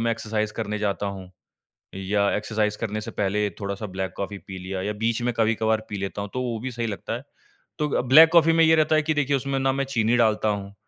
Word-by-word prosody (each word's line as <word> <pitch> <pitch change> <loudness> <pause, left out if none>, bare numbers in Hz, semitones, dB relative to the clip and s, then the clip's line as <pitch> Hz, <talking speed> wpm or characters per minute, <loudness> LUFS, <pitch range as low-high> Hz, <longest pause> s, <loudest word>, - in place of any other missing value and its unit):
मैं 115 0 +1
एक्सरसाइज़ 110 -1 -2
करने 105 -1 -3
जाता 100 -1 -1
हूँ, 95 -2 -7 0.6
या 100 +1 0
एक्सरसाइज़ 105 0 -1
करने 110 -1 -3
से - - -6
पहले 105 +1 0
थोड़ा-सा 100 +1 -4
ब्लैक 95 0 -4
कॉफ़ी 100 0 -4
पी 95 -1 -9
लिया 95 +1 -5
या 105 +2 -2
बीच 115 +1 +1
में 120 0 0
कभी-कभार 110 -1 +1
पी 105 - -4
लेता 100 +1 -4
हूँ 100 - -6
तो 130 - -1
वो 120 -2 -2
भी 130 - -4
सही 120 -1 -3
लगता 105 +1 -5
है। 120 - -5 0.6
तो 150 - 0
अ, - - +1
ब्लैक 155 +6 +8
कॉफ़ी 165 -1 +6
में 165 0 +5
ये 160 0 +5
रहता 155 0 +3
है 155 - +3
कि 155 +1 0
देखिए 145 -1 +1
उसमें 135 +1 -2
ना 135 0 +1
मैं 135 0 -1
चीनी 120 -3 +1
डालता 110 -2 +2
हूँ, 100 -1 -3
110 Hz, 245 wpm, -24 LUFS, 100-130 Hz, 0.6 s, ब्लैक